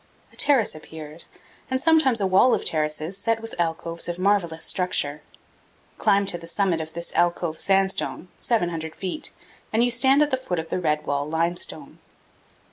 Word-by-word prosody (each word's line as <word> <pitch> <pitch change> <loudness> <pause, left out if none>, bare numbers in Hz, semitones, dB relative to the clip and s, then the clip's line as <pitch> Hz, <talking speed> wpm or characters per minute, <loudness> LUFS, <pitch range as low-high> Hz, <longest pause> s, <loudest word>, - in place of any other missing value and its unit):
A - - -16
terrace 270 -7 +3
appears, 155 0 -10 0.4
and 260 0 0
sometimes 295 -5 +4
a 200 - +1
wall 190 +7 +5
of - - -4
terraces 155 +4 -1
set 225 +2 0
with 225 0 -9
alcoves 165 0 -2
of 175 - -3
marvelous 185 -4 +1
structure. 150 -5 0 0.8
Climb 200 -2 +3
to 175 -3 0
the 165 - -11
summit 175 -2 0
of 160 0 -8
this 170 0 -6
alcove 175 -2 +1
sandstone 195 -2 0
700 170 -8 -1
feet 190 +9 -4 0.4
and 225 +2 +3
you 245 - +2
stand 265 +4 +4
at 295 - -2
the 260 - +2
foot 255 -9 -3
of 160 0 -4
the - - 0
red 155 -3 0
wall 145 +1 -1
limestone. 170 +2 -1
175 Hz, 170 wpm, -24 LUFS, 160-220 Hz, 0.8 s, wall